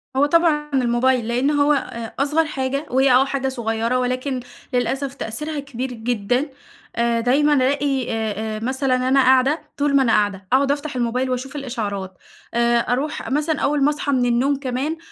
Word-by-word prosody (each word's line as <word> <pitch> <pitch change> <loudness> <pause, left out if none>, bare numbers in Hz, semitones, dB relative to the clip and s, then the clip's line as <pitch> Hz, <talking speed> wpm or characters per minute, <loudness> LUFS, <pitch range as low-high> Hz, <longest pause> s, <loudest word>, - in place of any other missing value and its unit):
هو 275 - +4
طبعًا 300 -1 +2
الموبايل، 250 -1 +2
لإن 250 +5 +1
هو 290 0 +3
آآ 235 -4 -4
أصغر 300 +3 +2
حاجة، 275 0 -3
وهي 265 +1 +3
آه 255 +2 +5
حاجة 270 -1 -2
صغيّرة 230 -1 -1
ولكن 255 +1 -2 0.3
للأسف 265 +2 -1
تأثيرها 290 +5 -4
كبير 260 -2 -5
جدًا، 245 +4 -1 0.5
آآ 235 0 +1
دايمًا 280 +5 +3
ألاقي 270 -1 +1
آآ 220 -1 -1 0.2
آآ 215 - -5
مثلًا 260 +2 0
أنا 275 - +4
قاعدة، 265 +4 +3 0.2
طول 285 -1 +1
ما 270 - +5
أنا 230 - +2
قاعدة 205 -2 0
أقعد 275 +1 +4
أفتح 290 -1 -3
الموبايل 250 +2 -1
وأشوف 255 +3 -4
الإشعارات، 210 -9 -4 0.4
آآ 235 0 +3
أروح 270 +6 -2
مثلًا 300 +1 0
أول 290 0 +1
ما 285 - +5
اصحى 295 -1 -2
من 255 -3 +2
النوم 245 +4 +2
كمان، 275 +4 -3
260 Hz, 170 wpm, -21 LUFS, 240-285 Hz, 0.5 s, آه